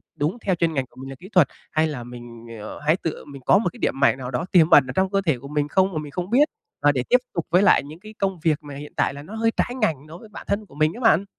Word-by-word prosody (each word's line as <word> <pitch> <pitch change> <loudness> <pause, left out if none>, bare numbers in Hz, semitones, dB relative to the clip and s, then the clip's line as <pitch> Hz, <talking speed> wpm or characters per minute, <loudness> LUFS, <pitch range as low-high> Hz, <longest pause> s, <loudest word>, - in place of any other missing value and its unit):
đúng 150 +10 -1
theo 190 -2 +2
chuyên 170 -1 0
ngành 135 -3 -1
của - - -27
mình 135 - -8
là 135 - -7
kỹ 190 - -12
thuật, 180 -9 +5 0.2
hay 155 +1 +2
là 145 -6 -5
mình, 120 -1 -11
ờ, 105 - -8
hãy 155 +3 +3
tự 160 - -4
mình 140 -2 -11
có - - +6
một 215 - +1
cái 245 - -14
điểm - - +1
mạnh 140 -2 +4
nào 125 -1 -6
đó 130 +7 -2
tiềm 165 -3 +5
ẩn 135 -3 +7
ở 125 - -5
trong 190 0 +2
cơ 195 0 +1
thể 155 -6 +2
của 140 - -10
mình 145 0 -1
không 190 +5 +2
mà - - -3
mình 150 -1 -9
không 180 +4 -4
biết, 275 +7 +4 0.3
và 145 - +5
để 130 -3 -1
tiếp 250 - +6 0.2
tục 170 -3 -2
với 180 +3 +4
lại 200 - +5
những 150 +4 -11
cái 215 +3 -12
công 195 -3 -1
việc 155 -1 0
mà 145 -1 -9
hiện 145 +1 -9
tại - - +1
là 140 +1 -9
nó 200 +8 -9
hơi 225 0 +1
trái 245 - 0
ngành 155 -8 0
đối 160 +2 -10
với 220 - -14
bản 210 - -10
thân 205 +1 -1
của 140 - -18
mình 155 +1 +2
á 240 - -9
bạn. 200 -5 +4
160 Hz, 325 wpm, -23 LUFS, 140-190 Hz, 0.3 s, ẩn